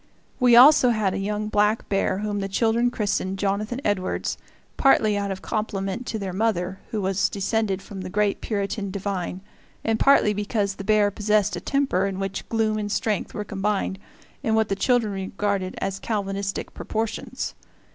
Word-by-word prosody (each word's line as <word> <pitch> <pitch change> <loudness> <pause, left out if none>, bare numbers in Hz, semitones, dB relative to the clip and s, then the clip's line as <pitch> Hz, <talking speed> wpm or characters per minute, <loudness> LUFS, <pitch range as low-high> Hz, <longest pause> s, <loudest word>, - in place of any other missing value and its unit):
We 250 -2 +6
also 260 +1 +8
had 215 -5 +1
a 195 - -2
young 210 +2 -2
black 210 +1 +1
bear 195 -1 +1
whom 205 0 -2
the 195 - -2
children 230 +4 +2
christened 200 -4 -1
Jonathan 205 +5 -1
Edwards, 195 -3 -1 0.4
partly 215 -6 +4
out 200 0 -1
of 190 -1 -5
compliment 210 +2 -3
to 225 - -2
their 195 -3 -4
mother, 190 -3 -1
who 215 - -2
was 190 +1 +1
descended 200 -1 -1
from 195 -2 -8
that 185 - -6
great 205 +1 0
Puritan 200 -1 -2
divine, 190 -2 -3 0.4
and 225 0 0
partly 275 -6 +5
because 205 0 -1
the 195 - -8
bear 210 0 +3
possessed 210 0 +1
a - - -5
temper 270 -9 +1
in 195 -1 -4
which 195 0 -4
gloom 220 -1 +1
and 205 -1 -3
strength 215 -1 -1
were 210 - -2
combined 195 -1 -1 0.4
in 220 - +1
what 220 -1 +2
the 195 - +1
children 225 0 +1
regarded 195 0 -2
as 195 0 -3
Calvinistic 200 -2 -3
proportions. 220 0 -3
205 Hz, 170 wpm, -24 LUFS, 195-220 Hz, 0.4 s, also